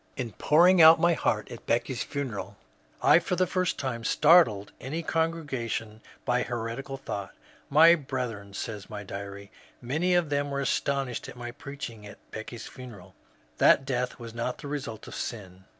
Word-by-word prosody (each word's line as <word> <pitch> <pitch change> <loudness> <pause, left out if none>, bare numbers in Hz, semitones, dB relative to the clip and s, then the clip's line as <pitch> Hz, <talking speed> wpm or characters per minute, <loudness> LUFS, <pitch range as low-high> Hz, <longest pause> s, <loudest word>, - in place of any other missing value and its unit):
In 125 -3 -3
pouring 175 - +5
out 160 +1 +9
my 170 0 +4
heart 105 -8 -1
at 120 - -10
Becky's 120 +2 0
funeral 110 -8 -4 0.5
I - - +7
for 180 - -2
the 185 +1 +2
first 185 0 -1
time 120 -4 -3
startled 135 - +4
any 155 +6 -4
con 165 0 +1
gregation 115 -9 -4 0.3
by 125 0 +2
a - - 0
heretical 120 +3 -4
thought. 100 -7 -6 0.3
My 160 +4 +8
brethren,'^ 125 -10 -4
so 110 - -4
says 100 -2 -10
my 105 -1 -6
diary, 100 0 -8
^* - - -23
many 160 +9 0
of 170 -4 +1
them, 145 0 0
were 140 0 -2
astonished 140 -2 -1
at - - -10
my 120 0 -6
preaching 120 -6 -8
at 100 - -12
Becky's 110 +1 -7
funeral 120 -8 -11 0.5
that 135 - +5
death 125 -2 -2
was 115 -2 -9
not 120 +2 -3
the - - -8
result 135 -7 -5
of - - -9
sin. 95 -5 -6
125 Hz, 180 wpm, -28 LUFS, 110-145 Hz, 0.5 s, out